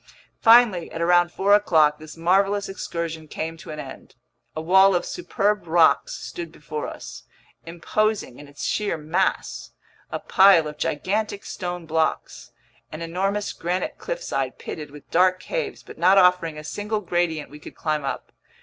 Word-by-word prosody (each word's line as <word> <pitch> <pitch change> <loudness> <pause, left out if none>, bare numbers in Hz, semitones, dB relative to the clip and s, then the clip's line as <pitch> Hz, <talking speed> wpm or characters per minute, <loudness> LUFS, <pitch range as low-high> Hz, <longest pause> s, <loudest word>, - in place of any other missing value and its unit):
Finally, 225 -7 +5
at - - -6
around 175 +1 +3
four 200 +3 +2
o'clock, 160 -7 +4
this 155 +1 -11
marvelous 195 +4 +2
excursion 170 -4 -5
came 160 +2 -5
to 165 - -13
an 150 - -6
end. 135 -3 -10 0.4
A - - -3
wall 190 +4 +5
of 175 - 0
superb 210 - -1
rocks 165 0 +3
stood 170 -2 -7
before 150 -1 -6
us, - - -9 0.4
imposing 200 - -1
in 145 - -11
its 145 0 -7
sheer 210 -5 -1
mass: 160 +5 -2 0.4
a - - -2
pile 190 -4 +5
of 150 0 -9
gigantic 200 +6 -2
stone 175 -2 -5
blocks, 160 0 -2 0.4
an 155 +2 -6
enormous 195 +5 -2
granite 175 +2 -3
cliffside - - -3
pitted 150 -2 -7
with 145 0 -14
dark 185 +1 +3
caves - - -4
but - - -13
not 185 +3 +5
offering 180 -4 +4
a 150 - -8
single 210 +7 -3
gradient 175 -5 -1
we 150 - -11
could - - -12
climb 155 -2 -2
up. 135 - -5
175 Hz, 160 wpm, -23 LUFS, 160-195 Hz, 0.4 s, Finally